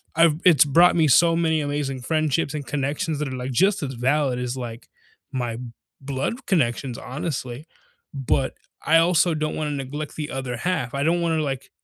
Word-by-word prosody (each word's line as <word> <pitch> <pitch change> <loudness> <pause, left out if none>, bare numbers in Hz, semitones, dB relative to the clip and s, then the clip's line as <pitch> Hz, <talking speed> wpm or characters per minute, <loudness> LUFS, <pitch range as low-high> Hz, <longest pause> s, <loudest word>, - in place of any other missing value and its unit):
I've 165 -1 +4
it's 160 -7 +7
brought 170 +5 +5
me 160 - +4
so 165 +5 +5
many 160 -2 +1
amazing 145 -2 -3
friendships 155 +1 0
and 145 -3 -5
connections 145 +2 -2
that 150 -2 -2
are 130 - -5
like 125 +1 -4
just 195 - +2
as 135 -2 -3
valid 130 +1 +1
as, 125 +1 -3
like, 120 -2 -7 0.4
my 120 -3 -3 0.4
blood 140 - -3
connections, 130 - 0
honestly. 130 -1 -5 0.5
But 135 -1 0 0.3
I 165 - +5
also 170 0 +3
don't 155 0 -2
want 155 -1 -2
to 145 - -3
neglect 145 +2 -5
the 150 -1 -4
other 130 -2 -4
half. 145 -4 -2
I 140 0 -1
don't 170 +3 +2
want 165 -1 +1
to 155 - 0
like, 135 -2 -4
145 Hz, 190 wpm, -23 LUFS, 130-160 Hz, 0.5 s, it's